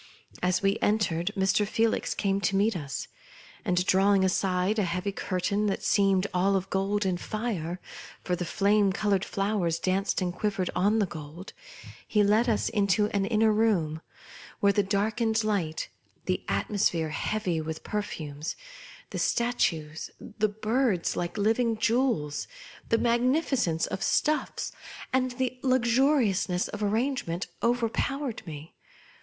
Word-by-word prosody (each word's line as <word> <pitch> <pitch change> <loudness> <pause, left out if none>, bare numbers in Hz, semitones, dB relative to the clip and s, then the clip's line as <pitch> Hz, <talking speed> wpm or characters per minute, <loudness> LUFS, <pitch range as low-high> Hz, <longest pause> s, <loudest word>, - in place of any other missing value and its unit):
As 180 +1 +1
we 195 +2 +2
entered, 200 -4 +1
Mr. 195 +2 +2
Felix 225 +1 0
came 195 -1 0
to 200 - +1
meet 205 +2 +2
us; 145 -5 -4 0.6
and 180 0 +1
drawing 195 +1 +4
aside 185 +2 +1
a - - +2
heavy 180 +3 -2
curtain 200 +2 -1
that 195 - -1
Bcemed 195 -2 +3
all 190 +2 +2
of 190 0 -2
gold 195 +2 0
and 180 -2 -1
fire 190 -6 -3 0.2
— - - -16
for 180 - 0
the 180 - -3
flame 200 +3 +2
coloured 200 -1 +1
flowers 195 -5 0
danced 185 +3 0
and 180 -2 -1
quivered 195 -1 -1
on 205 +5 +3
the 210 - +3
gold 165 +2 -9 0.3
— - - -16
he 210 -2 +3
led 215 +4 +3
us 220 - +1
into 205 0 +2
an 200 -1 +1
inner 220 0 +3
room, 180 -8 +1 0.6
where 200 0 +4
the 205 - +3
darkened 220 +3 0
light, 190 -7 -1 0.4
the - - -1
atmosphere 175 -6 0
heavy 175 0 -1
with 160 0 -5
perfumes, 155 -8 -4 0.6
the - - -3
statues, 165 -10 0 0.3
the 215 0 +3
birds 215 -2 0
like 175 +3 -3
liv 220 +3 +2
ing 230 -2 +1
jewels, 225 - 0 0.4
the 230 - +4
magnificence 240 - +1
of - - -4
stufis, 305 0 0 0.4
and 255 -1 +1
the 255 -1 -2
luxuriousness 240 -7 +2
of 210 - -6
arrangement 210 -4 -1 0.2
overpowered 245 +2 -1
me. 155 0 -8
200 Hz, 145 wpm, -28 LUFS, 180-220 Hz, 0.6 s, drawing